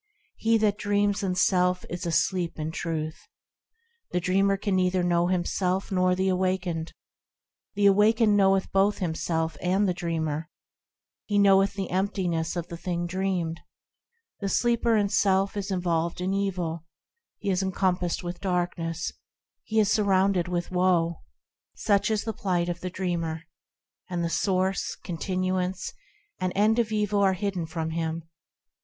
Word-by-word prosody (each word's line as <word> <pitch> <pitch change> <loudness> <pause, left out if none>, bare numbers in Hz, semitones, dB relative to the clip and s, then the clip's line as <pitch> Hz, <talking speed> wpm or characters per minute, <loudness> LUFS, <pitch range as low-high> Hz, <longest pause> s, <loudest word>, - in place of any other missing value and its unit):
He 225 0 +3
that 210 -1 +1
dreams 205 0 +1
in 185 -2 -1
self 180 0 +2
is 175 0 -5
asleep 170 +1 0
in 155 0 -3
Truth. 160 -1 -4 0.8
The 180 - 0
dreamer 195 +2 +2
can 200 -1 -1
neither 185 0 +2
know 175 0 +2
himself 185 +1 0
nor 185 -1 +2
the 190 +1 0
awakened; 185 -3 -1 0.8
The 205 0 +2
awakened 210 +2 +5
knoweth 195 -1 +3
both 195 +2 +3
himself 160 -3 -2
and 190 +3 +2
the 180 - +1
dreamer, 165 -2 -2 0.8
He 205 - -1
also 200 - +5
knoweth 195 0 +5
the 195 -2 -4
emptiness 180 -4 -1
of 175 -1 -3
the 170 - -7
thing 175 0 -2
dreamed. 175 -2 -2 0.8
The 200 - -2
sleeper 235 +1 +2
in 205 -1 +2
self 195 0 +2
is 200 0 -3
involved 170 -3 -1
in 185 +2 -1
evil; 180 -5 -2 0.5
He 200 - -2
is 185 0 +1
encompassed 185 -2 0
with 175 0 -5
darkness; 175 -3 -2 0.5
He 220 0 +1
is 210 -1 +3
surrounded 195 -3 +2
with 175 0 -2
woe; 180 -2 +2 0.5
Such 205 +1 +2
is 215 -1 0
the 220 - -3
plight 175 -3 -1
of 175 -1 -3
the 185 - -4
dreamer, 170 -3 -3 0.7
And 175 -2 -2
the 165 - -1
source, 190 0 0
continuance, 185 +1 -2 0.5
and 185 -1 -1
end 215 +3 +3
of 230 -2 0
evil 210 -1 +1
are 195 -1 +4
hidden 185 -3 -2
from 160 0 -3
him. 165 0 -2
185 Hz, 150 wpm, -26 LUFS, 175-200 Hz, 0.8 s, awakened